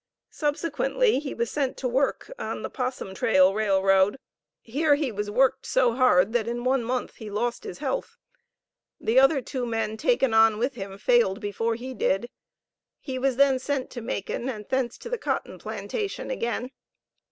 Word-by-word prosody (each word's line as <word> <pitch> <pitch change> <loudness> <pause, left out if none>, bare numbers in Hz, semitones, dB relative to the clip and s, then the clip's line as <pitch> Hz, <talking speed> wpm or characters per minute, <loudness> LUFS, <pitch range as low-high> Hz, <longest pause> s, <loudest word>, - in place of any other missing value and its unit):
Subsequently 330 - +1
he 285 -1 -5
was 235 -1 -2
sent 275 -3 -1
to 260 - -2
work 265 - 0
on - - -4
the - - -4
Possum 250 -6 -4
Tail 190 -1 +4
Railroad. 195 0 +3 0.4
Here 290 +5 +2
he 285 -4 -1
was 210 0 -3
worked 265 +4 +2
so 255 -2 +3
hard, 230 -5 +4
that 235 -2 +1
in 240 +1 -3
one 255 -1 +2
month 250 +2 -3
he 220 -2 -8
lost 235 +4 -2
his - - -6
health. - - -3 0.8
The 235 +4 +3
other 270 0 +4
two 255 0 -4
men 225 -2 -2
taken 270 - +2
on 220 -1 +5
with 250 +5 0
him, 195 -4 -7
failed 230 -3 +3
before 225 +2 -1
he 255 +3 -6
did. 240 0 0 0.7
He 260 -2 -5
was 265 -1 +1
then 270 0 +4
sent 270 0 -2
to 240 - -6
Macon, 230 +2 -3
and 210 -5 -6
thence 260 -3 -1
to - - -9
the - - -3
cotton - - -3
plantation 425 -1 -4
again. 250 - -2
245 Hz, 175 wpm, -26 LUFS, 220-270 Hz, 0.8 s, on